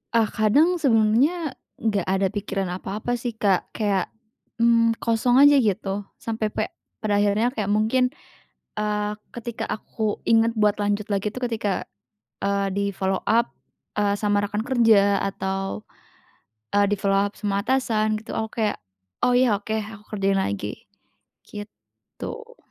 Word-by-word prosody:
Ah 230 Hz, -, +5 dB
kadang 300 Hz, +12 st, +3 dB
sebelumnya 270 Hz, +6 st, +3 dB, 0.2 s
nggak 205 Hz, -5 st, -1 dB
ada 190 Hz, 0 st, +2 dB
pikiran 195 Hz, -3 st, -3 dB
apa-apa 215 Hz, +5 st, -3 dB
sih, 240 Hz, -2 st, -4 dB
Kak, 200 Hz, -4 st, 0 dB
kayak, 200 Hz, -4 st, 0 dB, 0.5 s
mmm, 230 Hz, -1 st, +4 dB
kosong 230 Hz, +2 st, +2 dB
aja 285 Hz, 0 st, +7 dB
gitu 200 Hz, -2 st, -1 dB
sampai 220 Hz, -1 st, -2 dB
pe 215 Hz, +1 st, -3 dB, 0.3 s
pada 205 Hz, -1 st, +2 dB
akhirnya 210 Hz, +4 st, +2 dB
kayak 215 Hz, -5 st, -2 dB
mungkin, 220 Hz, +5 st, +2 dB, 0.7 s
eee, 210 Hz, 0 st, -1 dB, 0.2 s
ketika 235 Hz, -1 st, -5 dB
aku 215 Hz, 0 st, -3 dB
ingat 225 Hz, 0 st, +4 dB
buat 210 Hz, -1 st, +4 dB
lanjut 205 Hz, 0 st, 0 dB
lagi 200 Hz, +1 st, 0 dB
itu 255 Hz, -, -7 dB
ketika, 225 Hz, -6 st, -2 dB, 0.6 s
eee, 200 Hz, 0 st, +1 dB
di-follow 195 Hz, -1 st, -1 dB
up, 235 Hz, +2 st, +3 dB, 0.5 s
eee, 205 Hz, -1 st, +2 dB
sama 205 Hz, -1 st, +1 dB
rekan 210 Hz, +1 st, -2 dB
kerja 220 Hz, -6 st, +4 dB
atau, 195 Hz, +1 st, -3 dB, 0.9 s
eee, 205 Hz, 0 st, +5 dB
di-follow 195 Hz, -1 st, +2 dB
up -, -, -41 dB
semua 200 Hz, -1 st, -1 dB
atasan 215 Hz, -5 st, +1 dB
gitu 220 Hz, -, -8 dB
aku 220 Hz, 0 st, -3 dB
kayak, 210 Hz, -, 0 dB, 0.5 s
"Oh 245 Hz, 0 st, +4 dB
ya 245 Hz, -4 st, +4 dB
oke 220 Hz, +1 st, -5 dB
aku 215 Hz, 0 st, -8 dB
kerjain 195 Hz, -1 st, +1 dB
lagi," 100 Hz, -, -3 dB, 0.6 s
gitu. 465 Hz, -, -10 dB
215 Hz, 135 wpm, -24 LUFS, 200-230 Hz, 0.9 s, aja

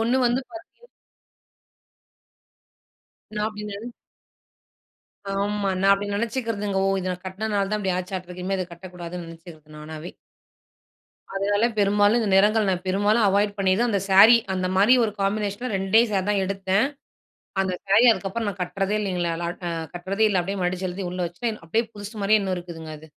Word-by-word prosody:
ஒண்ணு 235 Hz, +3 st, +2 dB
வந்து 240 Hz, +2 st, +1 dB
பார்த்தீ 340 Hz, +8 st, -13 dB, 2.5 s
நா 210 Hz, -, -2 dB
அப்படி 210 Hz, -1 st, -8 dB
நென 205 Hz, +3 st, -7 dB, 1.5 s
ஆமா. 200 Hz, 0 st, -1 dB
நா 195 Hz, -, +4 dB
அப்படி 200 Hz, +1 st, -1 dB
நெனைச்சுக்கிறதுங்க. 225 Hz, -2 st, -2 dB
ஓ! -, -, +2 dB
இத 185 Hz, -, -3 dB
நா -, -, -5 dB
கட்டினதுனால 200 Hz, +1 st, -2 dB
தான் 210 Hz, -, 0 dB
இப்படி 190 Hz, -3 st, 0 dB
ஆச்சாட்டுருக்கு, 180 Hz, -1 st, -6 dB
இனிமே 195 Hz, +1 st, 0 dB
இத 185 Hz, -, -2 dB
கட்டக்கூடாதுன்னு 175 Hz, 0 st, -8 dB
நெனைச்சிக்கிறது 165 Hz, -2 st, -13 dB
நானாவே. 155 Hz, +3 st, -8 dB, 1.2 s
அதனால 205 Hz, +2 st, +1 dB
பெரும்பாலும் 205 Hz, +3 st, +4 dB
இந்த 220 Hz, -, -1 dB
நிறங்கள், 210 Hz, +2 st, +4 dB
நான் 180 Hz, -1 st, -1 dB
பெரும்பாலும் 205 Hz, +4 st, +2 dB
அவாய்ட் 205 Hz, +1 st, +1 dB
பண்ணிதான், 195 Hz, +5 st, +2 dB
அந்த 200 Hz, -, +1 dB
சாரி 210 Hz, +5 st, +9 dB, 0.2 s
அந்த 185 Hz, 0 st, -1 dB
மாரி 205 Hz, +6 st, +6 dB
ஒரு 210 Hz, -, -2 dB
காம்பினேஷன்ல 205 Hz, +4 st, -1 dB
2ஏ 195 Hz, +4 st, +4 dB
சாரி 190 Hz, -2 st, +1 dB
தான் 200 Hz, -2 st, +1 dB
எடுத்தேன், 195 Hz, +3 st, +1 dB, 0.8 s
அந்த 190 Hz, -1 st, -1 dB
சாரீ 200 Hz, +4 st, +5 dB
அதுக்கப்புறம் 220 Hz, +1 st, -2 dB
நான் 195 Hz, -1 st, -8 dB
கட்டுறதே 195 Hz, +3 st, -1 dB
இல்லைங்களேலா 175 Hz, -3 st, -2 dB
க் 175 Hz, -, -6 dB, 0.3 s
கட்டுறதே 195 Hz, +5 st, 0 dB
இல்ல, 190 Hz, -3 st, +2 dB
அப்படியே 195 Hz, +2 st, -4 dB
மடிச்சு 180 Hz, +1 st, -1 dB
எழுதி 185 Hz, +2 st, -5 dB
உள்ள 180 Hz, -, -6 dB
வச்சுட்டேன். 215 Hz, +6 st, -4 dB
அப்படியே 220 Hz, +8 st, 0 dB
புதுசு 205 Hz, +2 st, -8 dB
மாரியே 215 Hz, +1 st, +4 dB
இன்னும் 190 Hz, -2 st, -2 dB
இருக்குதுங்க 165 Hz, -3 st, -8 dB
அது. 160 Hz, 0 st, -15 dB
195 Hz, 155 wpm, -24 LUFS, 185-210 Hz, 2.5 s, சாரி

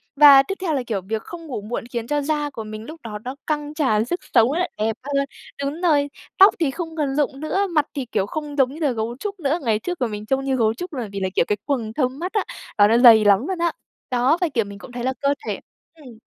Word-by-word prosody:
Và 280 Hz, -2 st, +9 dB
tiếp 390 Hz, -, -4 dB
theo 345 Hz, -4 st, 0 dB
là, 270 Hz, -3 st, 0 dB
kiểu, 205 Hz, -4 st, -1 dB
việc 215 Hz, +4 st, -3 dB
không 335 Hz, -2 st, -9 dB
ngủ 250 Hz, -7 st, -4 dB
muộn 220 Hz, +4 st, -4 dB
khiến 235 Hz, -2 st, -3 dB
cho 295 Hz, +2 st, 0 dB
da 295 Hz, 0 st, -1 dB
của 225 Hz, -5 st, -7 dB
mình 215 Hz, 0 st, -8 dB
lúc 315 Hz, +4 st, -10 dB
đó 210 Hz, -2 st, -6 dB
nó 255 Hz, +2 st, -5 dB
căng 295 Hz, -1 st, -2 dB
tràn 255 Hz, -8 st, +1 dB
sức 350 Hz, +9 st, -2 dB, 0.2 s
sống 230 Hz, +1 st, +6 dB
á, 355 Hz, +4 st, 0 dB
đẹp 220 Hz, +1 st, 0 dB
hơn, 275 Hz, 0 st, 0 dB, 0.4 s
đúng 290 Hz, +5 st, -3 dB
rồi, 290 Hz, -5 st, +3 dB, 0.3 s
tóc 390 Hz, +2 st, +8 dB
thì 310 Hz, -5 st, +1 dB
không 325 Hz, +3 st, -6 dB
còn 280 Hz, -3 st, 0 dB
rụng 280 Hz, -2 st, 0 dB
nữa, 385 Hz, +7 st, 0 dB
mặt 310 Hz, -5 st, +1 dB
thì 275 Hz, -3 st, -2 dB
kiểu 210 Hz, -4 st, -1 dB
không 295 Hz, +6 st, -5 dB
giống 265 Hz, -1 st, +3 dB
như 310 Hz, -, -9 dB
là 290 Hz, -, +2 dB
gấu 230 Hz, 0 st, -3 dB
trúc 400 Hz, +1 st, -5 dB
nữa. 305 Hz, +1 st, 0 dB
Ngày 220 Hz, -4 st, +1 dB
trước 355 Hz, +4 st, -5 dB
mặt 245 Hz, -, +2 dB
mình 210 Hz, 0 st, -6 dB
trông 270 Hz, +4 st, 0 dB
như 270 Hz, -1 st, +1 dB
gấu 225 Hz, -3 st, +2 dB
trúc 345 Hz, +7 st, -7 dB
là 245 Hz, -5 st, -3 dB
vì 200 Hz, -, -4 dB
là, 190 Hz, -1 st, -1 dB
kiểu, -, -, +3 dB
cái 210 Hz, -, 0 dB
quầng 235 Hz, -6 st, -2 dB
thâm 260 Hz, 0 st, -1 dB
mắt 360 Hz, +3 st, -4 dB
á, 420 Hz, -3 st, +1 dB, 0.3 s
đó, 205 Hz, -1 st, +7 dB
nó 230 Hz, -, +4 dB
dày 230 Hz, -3 st, +8 dB
lắm 205 Hz, +7 st, +4 dB
luôn 375 Hz, -, -2 dB
á. 340 Hz, 0 st, +2 dB, 0.4 s
Đó, 255 Hz, +6 st, +3 dB
và, 355 Hz, -, +3 dB
kiểu, 230 Hz, -4 st, +1 dB
mình 200 Hz, 0 st, -10 dB
cũng 245 Hz, -, -11 dB
thấy 240 Hz, -1 st, -5 dB
là 260 Hz, +1 st, 0 dB
cơ 280 Hz, 0 st, +3 dB
thể -, -, -2 dB, 0.4 s
ừm. 260 Hz, -8 st, -14 dB
270 Hz, 275 wpm, -22 LUFS, 225-310 Hz, 0.4 s, Và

